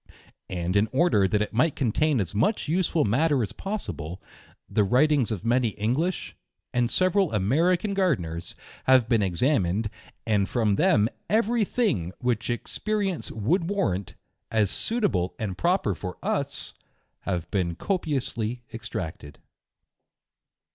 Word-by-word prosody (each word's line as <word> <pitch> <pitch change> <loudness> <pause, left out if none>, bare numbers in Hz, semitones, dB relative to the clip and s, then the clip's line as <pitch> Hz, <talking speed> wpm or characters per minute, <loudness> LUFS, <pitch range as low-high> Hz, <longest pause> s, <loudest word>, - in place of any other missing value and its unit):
And 90 +1 -2
in 100 +2 +4
order 130 - +3
that 105 +3 +1
it 105 - -7
might 135 +7 +2
contain 140 +4 +1
v - - +2
as 85 - -8
much 145 - +1
useful 165 -1 +1
matter 135 +4 +2
as 100 - -3
possible, 95 - -5 0.5
the 105 - +2
writings 130 +4 +3
of 110 -2 -4
many 120 +1 +3
English, 135 - -1 0.4
and 120 -1 +2
several 185 +1 +2
American 165 - +2
G 195 - 0
rdeners, 85 - -1 0.3
have 130 -3 +5
been 115 -2 +3
ex 90 -4 -1
amined, 105 - +1 0.3
and 105 -3 +1
from 110 -5 +1
them 155 - +4 0.2
every 230 +1 +2
thing 145 - 0
which 120 -2 -1
experience 195 - -2
would 115 - +1
i - - -4
warrant, 170 - -1 0.3
as 105 -4 +2
suitable 110 - 0
and 100 -4 -3
proper 170 - +1
for 90 +1 -6
us, - - -2 0.5
have 90 -3 -3
been 90 -4 0
copious 155 - -2
ly 120 +2 -3
extracted. 90 -9 -6
120 Hz, 140 wpm, -26 LUFS, 100-170 Hz, 0.5 s, have